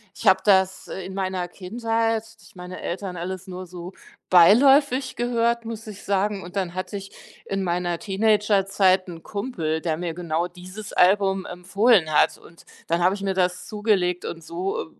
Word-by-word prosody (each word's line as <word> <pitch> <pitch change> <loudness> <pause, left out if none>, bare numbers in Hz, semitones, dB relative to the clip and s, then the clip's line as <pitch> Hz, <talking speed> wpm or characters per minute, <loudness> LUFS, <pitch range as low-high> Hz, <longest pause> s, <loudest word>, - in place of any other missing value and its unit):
Ich 225 - -4
habe 190 0 +6
das, 190 -2 +3
äh, 190 - -6
in 190 - -7
meiner 185 -2 -2
Kindheit 225 +4 -1 0.2
durch - - -19
meine 180 0 -8
Eltern 185 +1 -4
alles 185 +2 -5
nur 185 -1 -8
so 180 +1 -9 0.4
beiläufig 260 - +5
gehört, 235 -1 0
muss 225 -1 -7
ich 205 -2 -9
sagen. 200 0 0
Und 180 +3 -8
dann 185 -3 -2
hatte 185 +3 -4
ich 195 0 -9 0.3
in 195 0 -2
meiner 175 -1 -1
Teenagerzeit 195 -2 +2
'n 165 -2 -9
Kumpel, 200 -8 -3
der 160 -1 -1
mir 170 0 -4
genau 170 0 -2
dieses 185 +4 -10
Album 195 0 +3
empfohlen 185 0 +2
hat - - +3
und 165 - -18 0.2
dann 170 +1 0
habe 185 +3 +3
ich 200 - -9
mir 195 -1 -1
das 180 -1 0
zugelegt 200 -5 0
und 165 -1 -6
so, 170 +4 -3
äh - - -6
190 Hz, 175 wpm, -24 LUFS, 180-210 Hz, 0.4 s, habe